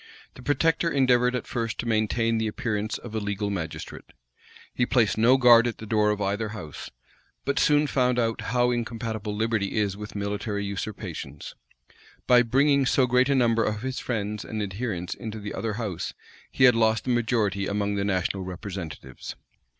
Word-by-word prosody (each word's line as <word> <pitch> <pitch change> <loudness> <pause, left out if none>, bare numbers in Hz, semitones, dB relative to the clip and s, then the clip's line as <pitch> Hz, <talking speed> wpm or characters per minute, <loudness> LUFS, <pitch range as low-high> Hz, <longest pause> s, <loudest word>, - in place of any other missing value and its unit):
The - - -12
protector 160 +5 +1
endeavored 125 -3 +3
at 125 - -3
first 115 -2 -3
to - - -3
maintain 115 0 +1
the 110 - 0
appearance 105 0 -2
of 120 - -10
a 110 - -1
legal 105 0 -2
magistrate. 85 -5 -6 0.6
He 125 - 0
placed 120 -4 +2
no 120 +4 +5
guard 120 -2 +7
at 115 - -3
the 110 - -8
door 105 -1 +2
of 105 -1 0
either 105 +2 -1
house; 75 -7 -8 0.6
but 140 0 0
soon 150 0 +4
found 125 -3 +1
how 120 +1 +1
incompatible 115 -3 -3
liberty 110 -2 -1
is 100 -2 +1
with 105 +1 -8
military 100 0 -2
usurpations. 100 -3 -6 0.7
By 125 -1 +6
bringing 135 +3 +3
so 130 +1 +3
great 125 +2 +3
a 140 - +3
number 115 -3 +3
of 105 +1 -2
his 130 0 -3
friends 105 -3 -3
and 110 - -5
adherents 95 -2 -3
into 110 -1 -7
the 105 0 -6
other 115 -2 -2
house 100 -6 -4 0.3
he 130 - 0
had 125 -1 +8
lost 110 -1 +2
the 130 - -1
majority 110 -5 +1
among 100 0 -1
the 100 -1 -1
national 95 0 -1
representatives. 90 - -7
110 Hz, 175 wpm, -26 LUFS, 100-125 Hz, 0.7 s, had